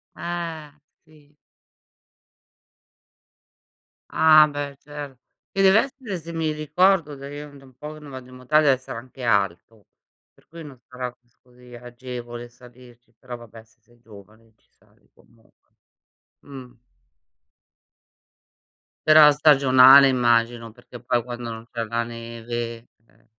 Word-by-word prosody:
Eh, 165 Hz, -3 st, -6 dB, 0.3 s
sì. 150 Hz, -2 st, -24 dB, 2.8 s
Ah, 155 Hz, -1 st, +6 dB
beh, 145 Hz, -1 st, -6 dB
cer 145 Hz, -3 st, -10 dB, 0.3 s
che 195 Hz, -, -1 dB
dev'essere, 215 Hz, +1 st, +1 dB
se 170 Hz, +1 st, -10 dB
mi 160 Hz, -2 st, -2 dB
ricordo 155 Hz, +1 st, +1 dB
da 140 Hz, 0 st, -10 dB
io 145 Hz, +1 st, -9 dB
è -, -, -17 dB
da 135 Hz, -, -17 dB
un 130 Hz, -, -19 dB
po' 150 Hz, +3 st, -9 dB
che 155 Hz, -, -13 dB
non 150 Hz, -2 st, -13 dB
vado 130 Hz, -1 st, -10 dB
in 130 Hz, -, -14 dB
montagna, 140 Hz, +1 st, +2 dB
sarà 125 Hz, -3 st, -9 dB
anche 130 Hz, +2 st, -15 dB
alto, 100 Hz, -1 st, -2 dB, 0.5 s
per -, -, -29 dB
cui 165 Hz, 0 st, -11 dB
non 135 Hz, -5 st, -13 dB
sarà 125 Hz, -1 st, -6 dB, 0.3 s
così 125 Hz, 0 st, -17 dB
agevole 120 Hz, 0 st, -9 dB
salirci. 120 Hz, -1 st, -19 dB
Però, 125 Hz, -1 st, -9 dB
vabbè, 115 Hz, -1 st, -14 dB
siete 120 Hz, +1 st, -29 dB
giovani, 110 Hz, +1 st, -18 dB
ci -, -, -40 dB
sali -, -, -32 dB
comunque. 115 Hz, -1 st, -29 dB, 0.7 s
Mh. 130 Hz, -3 st, -12 dB, 2.4 s
Però 155 Hz, -1 st, +8 dB
stagionale, 135 Hz, -2 st, +6 dB
immagino, 120 Hz, -2 st, 0 dB
perché 120 Hz, +1 st, -14 dB
poi 120 Hz, -1 st, -1 dB
quando 120 Hz, -1 st, -7 dB
non 115 Hz, 0 st, -8 dB
c'è 115 Hz, -1 st, -4 dB
la 115 Hz, +2 st, -2 dB
neve, 115 Hz, 0 st, -7 dB, 0.2 s
eh -, -, -30 dB
125 Hz, 130 wpm, -23 LUFS, 120-150 Hz, 2.8 s, Però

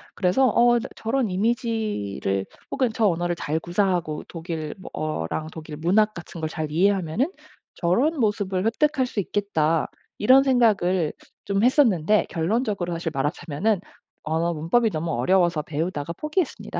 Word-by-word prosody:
그래서 190 Hz, +9 st, +3 dB
'어 240 Hz, +1 st, +4 dB
나 -, -, -5 dB
저런 230 Hz, +1 st, -1 dB
이미지를 205 Hz, -, -1 dB, 0.3 s
혹은 260 Hz, -3 st, +1 dB
저 225 Hz, -1 st, +1 dB
언어를 175 Hz, -1 st, 0 dB
잘 160 Hz, -1 st, -2 dB
구사하고 175 Hz, -3 st, -1 dB
독일 160 Hz, -2 st, -5 dB
뭐 185 Hz, -, -9 dB
어랑 155 Hz, -, -3 dB
독일 155 Hz, -1 st, -8 dB
문학 205 Hz, +7 st, +2 dB
같은 170 Hz, 0 st, -9 dB
걸 -, -, -1 dB
잘 155 Hz, -2 st, -2 dB
이해하면은 195 Hz, -, +1 dB, 0.4 s
저런 255 Hz, -, +1 dB
모습을 205 Hz, -4 st, 0 dB
획득할 270 Hz, +4 st, +2 dB
수 230 Hz, -, -3 dB
있겠다.' 165 Hz, -5 st, 0 dB, 0.3 s
이런 260 Hz, +6 st, +6 dB
생각을 200 Hz, -, +2 dB, 0.3 s
좀 200 Hz, +1 st, 0 dB
했었는데 215 Hz, -, +3 dB
결론적으로 190 Hz, 0 st, -1 dB
사실 165 Hz, 0 st, -3 dB
말하자면은 165 Hz, +7 st, -1 dB, 0.4 s
언어 165 Hz, +2 st, 0 dB
문법이 170 Hz, +10 st, +2 dB
너무 165 Hz, -2 st, -3 dB
어려워서 170 Hz, +5 st, +2 dB
배우다가 155 Hz, +1 st, -3 dB
포기했습니다. 305 Hz, -, -3 dB
185 Hz, 340 characters per minute, -24 LUFS, 160-225 Hz, 0.4 s, 이런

